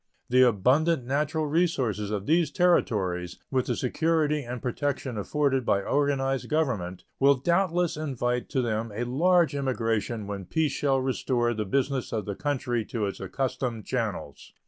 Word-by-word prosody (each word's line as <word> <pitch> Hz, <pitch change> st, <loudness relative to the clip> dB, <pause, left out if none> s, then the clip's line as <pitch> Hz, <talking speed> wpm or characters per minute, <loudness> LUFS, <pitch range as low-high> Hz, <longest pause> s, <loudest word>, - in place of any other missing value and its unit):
The 130 Hz, +1 st, +5 dB
abundant 130 Hz, -, +3 dB
natural 150 Hz, +4 st, 0 dB
resources 140 Hz, -, 0 dB
of 105 Hz, -2 st, -3 dB
these 165 Hz, +1 st, +3 dB
Territories, 95 Hz, -, +1 dB
with 130 Hz, -2 st, 0 dB
the 120 Hz, -, 0 dB
security 150 Hz, +3 st, +1 dB
and 125 Hz, -1 st, -6 dB
protection 130 Hz, +1 st, -2 dB
afforded 135 Hz, +5 st, 0 dB
by 100 Hz, -3 st, +1 dB
organized 135 Hz, -1 st, 0 dB
government, 115 Hz, -, -1 dB, 0.2 s
will 140 Hz, +1 st, +5 dB
doubtless 175 Hz, +3 st, +1 dB
invite 125 Hz, -5 st, -2 dB
to 130 Hz, -, 0 dB
them 110 Hz, -1 st, -2 dB
a 115 Hz, -, -1 dB
large 170 Hz, +7 st, +3 dB
immigration 115 Hz, -5 st, -1 dB
when 100 Hz, -2 st, -5 dB
peace 155 Hz, -, 0 dB
shall 135 Hz, -1 st, +1 dB
restore 125 Hz, -2 st, 0 dB
the 110 Hz, -1 st, -3 dB
business 135 Hz, +4 st, -1 dB
of 110 Hz, -4 st, -2 dB
the 100 Hz, -, -3 dB
country 125 Hz, -2 st, -1 dB
to 110 Hz, -2 st, -2 dB
its 100 Hz, -, -4 dB
accustomed 120 Hz, +2 st, -3 dB
channels. -, -, -4 dB
130 Hz, 150 wpm, -27 LUFS, 115-145 Hz, 0.2 s, The